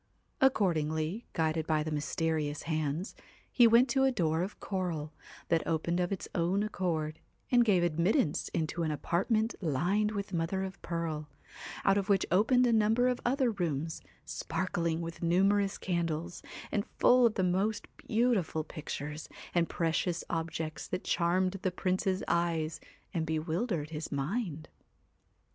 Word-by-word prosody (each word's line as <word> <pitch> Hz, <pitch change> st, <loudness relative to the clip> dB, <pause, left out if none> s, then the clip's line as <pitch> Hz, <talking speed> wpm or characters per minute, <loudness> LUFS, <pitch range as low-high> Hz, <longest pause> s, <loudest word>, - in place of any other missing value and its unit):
Accordingly, 170 Hz, -, +1 dB
guided 160 Hz, -1 st, 0 dB
by 155 Hz, -1 st, +2 dB
the 155 Hz, -, -4 dB
WHITE -, -, -1 dB
mysterious 150 Hz, 0 st, -1 dB
hands, 155 Hz, +2 st, -2 dB, 0.4 s
he 240 Hz, -2 st, +6 dB
went 235 Hz, +3 st, +6 dB
to 265 Hz, +2 st, +2 dB
a 265 Hz, -, +4 dB
door 165 Hz, -8 st, +1 dB
of 190 Hz, +3 st, -4 dB
coral, 170 Hz, -6 st, -3 dB, 0.4 s
that 165 Hz, -, +4 dB
CAT -, -, -11 dB
opened 170 Hz, +2 st, 0 dB
of 180 Hz, +1 st, 0 dB
its 195 Hz, -, -3 dB
own 180 Hz, +4 st, +1 dB
accord, 165 Hz, -7 st, -2 dB, 0.3 s
and 245 Hz, -1 st, +6 dB
gave 195 Hz, -6 st, +3 dB
admittance 170 Hz, -, +1 dB
into 160 Hz, +1 st, -2 dB
an 160 Hz, -, 0 dB
apartment 215 Hz, -, 0 dB
lined 180 Hz, +7 st, +1 dB
with 200 Hz, -2 st, -4 dB
mother 175 Hz, +3 st, 0 dB
of 190 Hz, -1 st, -7 dB
pearl, 160 Hz, -3 st, -3 dB, 0.6 s
out 195 Hz, +1 st, +5 dB
of 200 Hz, +1 st, -4 dB
which 195 Hz, -2 st, +3 dB
opened 235 Hz, +7 st, +4 dB
a 240 Hz, -, +3 dB
number 225 Hz, +3 st, +3 dB
of 250 Hz, -, -1 dB
other 255 Hz, 0 st, +2 dB
rooms, 165 Hz, -5 st, -2 dB, 0.2 s
spark 180 Hz, +3 st, -3 dB
ling 170 Hz, -1 st, 0 dB
with 165 Hz, 0 st, -6 dB
numerous 195 Hz, +3 st, +2 dB
candles, 170 Hz, -1 st, -2 dB, 0.3 s
and 205 Hz, -, -1 dB
full 250 Hz, -1 st, +6 dB
of 220 Hz, -, -3 dB
the 190 Hz, -, +1 dB
most 195 Hz, +4 st, 0 dB
beautiful 215 Hz, -9 st, +1 dB
pictures 150 Hz, -1 st, -6 dB, 0.2 s
and 170 Hz, -1 st, +2 dB
precious 170 Hz, +1 st, 0 dB
objects 160 Hz, -1 st, -3 dB
that 180 Hz, -, -3 dB
charmed 185 Hz, +2 st, +1 dB
the 190 Hz, -, +1 dB
Prince's 185 Hz, +1 st, -1 dB
eyes 165 Hz, -2 st, 0 dB, 0.3 s
and 160 Hz, -1 st, -1 dB
bewildered 160 Hz, +1 st, -1 dB
his 155 Hz, 0 st, -5 dB
mind. 155 Hz, -, -2 dB
175 Hz, 155 wpm, -31 LUFS, 160-200 Hz, 0.6 s, he